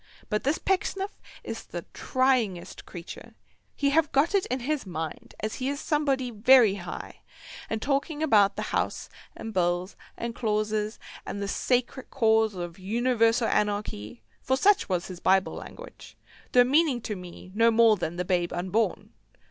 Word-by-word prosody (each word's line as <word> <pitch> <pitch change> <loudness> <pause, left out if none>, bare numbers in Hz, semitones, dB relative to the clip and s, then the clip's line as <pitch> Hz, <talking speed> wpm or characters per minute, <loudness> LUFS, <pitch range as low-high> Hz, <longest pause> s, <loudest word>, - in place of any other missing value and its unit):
But 210 -1 -1
this 285 +4 +1
Pecksniff 390 +1 -2 0.2
is - - -5
the - - -7
tryingest 255 -9 0
creature; 175 -2 -10 0.4
he 280 0 +1
having 310 0 +3
got 290 +8 +2
it 395 -2 +2
in 255 0 -2
his 295 +3 -1
mind 160 -4 -6
as 215 +1 -2
he 260 +1 -2
is 285 0 -3
Somebody 275 -5 0
very 230 -1 +6
high, 185 -3 -7 0.5
and 220 0 -2
talking 290 +3 -1
about 210 -9 +4
the - - -3
House, - - -1 0.3
and 225 - -6
Bills, 175 0 0 0.2
and 235 0 -4
clauses, 215 -1 -1 0.3
and 200 - -5
the 200 - -3
"sacred 250 +4 -1
cause 220 -4 +2
of 175 0 -6
Universal 230 +3 +2
Anarchy," 205 - -2 0.2
for 260 0 +1
such 405 - +3
was 180 -1 0
his 185 -2 -8
Bible 190 +1 +2
language, - - -11 0.4
though 245 - +7
meaning 280 0 +3
to 215 - -4
me 180 0 -10
no 230 +2 +4
more 225 -1 +5
than 175 -3 -4
the 180 +1 -2
babe 175 -2 0
unborn. 190 +6 -1
225 Hz, 160 wpm, -27 LUFS, 190-265 Hz, 0.5 s, though